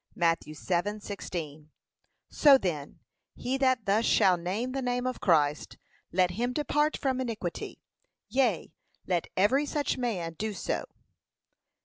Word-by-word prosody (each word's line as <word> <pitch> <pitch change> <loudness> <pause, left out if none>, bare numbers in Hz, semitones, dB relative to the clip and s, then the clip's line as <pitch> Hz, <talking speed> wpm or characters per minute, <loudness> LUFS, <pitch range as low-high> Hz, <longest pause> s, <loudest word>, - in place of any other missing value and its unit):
(Matt. 165 -1 +2
7:16) 175 -2 -4 0.6
So 285 -3 +7
then, 160 - -4 0.3
he 255 +2 -2
that 260 -4 +2
thus 205 +3 +2
shall 185 -5 +4
name 190 +9 -3
the 270 +1 -2
name 245 0 -1
of 255 0 -2
Christ, 150 -4 +2 0.3
let 180 0 +2
him 240 +7 -2
depart 295 +2 +1
from 260 -2 -1
iniquity: 220 -8 -5 0.4
yea, 245 -11 0 0.3
let 175 -3 0
every 265 +10 +3
such 290 -2 -1
man 185 -10 -2
do 215 +5 -3
so. - - -2
205 Hz, 125 wpm, -29 LUFS, 175-255 Hz, 0.6 s, So